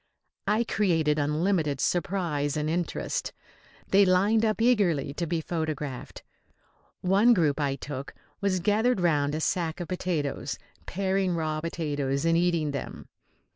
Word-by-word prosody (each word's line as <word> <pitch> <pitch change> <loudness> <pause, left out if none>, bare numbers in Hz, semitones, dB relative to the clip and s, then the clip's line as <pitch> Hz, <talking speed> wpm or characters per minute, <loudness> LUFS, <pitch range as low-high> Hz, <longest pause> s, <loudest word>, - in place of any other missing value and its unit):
I 215 +3 +3
created 160 -9 +1
unlimited 150 0 +1
surprise 165 -5 0
and 150 0 -1
interest. 170 +2 -2 0.6
They 200 +1 +6
lined 200 +4 +3
up 215 -1 +1
eagerly 195 - +2
to 170 +3 -3
be 165 0 -1
photographed. 155 -5 -4 0.8
One 200 +6 +5
group 155 -5 +2
I 140 -2 0
took 140 -1 -7 0.3
was 190 -2 +1
gathered 215 +4 +2
round 150 -4 +2
a - - -2
sack 165 +1 -1
of 175 - -4
potatoes, 175 -6 -2 0.3
paring 190 -1 0
raw 155 -1 -2
potatoes 145 -4 -2
and 165 0 +3
eating 170 -3 +1
them. 140 - -6
170 Hz, 135 wpm, -27 LUFS, 150-190 Hz, 0.8 s, They